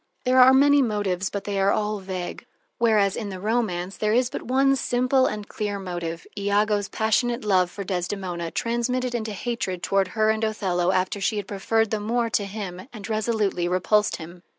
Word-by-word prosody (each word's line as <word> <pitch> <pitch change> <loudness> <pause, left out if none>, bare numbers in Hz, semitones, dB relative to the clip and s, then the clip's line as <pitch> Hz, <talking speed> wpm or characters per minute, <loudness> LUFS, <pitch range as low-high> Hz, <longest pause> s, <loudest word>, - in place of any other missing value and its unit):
There 255 +1 +4
are 255 +1 +8
many 285 +2 +5
motives, 205 -6 -1
but 200 -1 -4
they 200 -1 -2
are 195 +1 +3
all 210 0 -1
vague. 185 -2 -6 0.3
Whereas 215 -4 +3
in 210 -3 -4
the 190 -1 -6
romance 200 -4 -1
there 215 0 +1
is 250 +1 +2
but - - -4
one 270 +2 +2
simple 255 +1 +2
and 210 -1 -4
clear 205 -1 -3
motive, 175 -3 -5
Iago's 205 0 +1
passionate 235 +2 0
love 185 -3 +3
for 200 - -6
Desdemona, 180 -2 -3
transmitted 240 +4 -1
into 220 -3 -3
hatred 195 -5 -3
toward 195 -1 +2
her 215 0 +4
and 220 0 -2
Othello 185 -5 0
after 190 +2 0
she 210 +2 0
had 205 - -3
preferred 225 +2 0
the 215 - 0
Moor 230 +2 -1
to 205 - +1
him 195 -1 -6
and 215 -3 -8
resolutely 215 -5 0
repulsed 190 +4 +2
him. 175 +1 -10
210 Hz, 185 wpm, -24 LUFS, 190-230 Hz, 0.3 s, are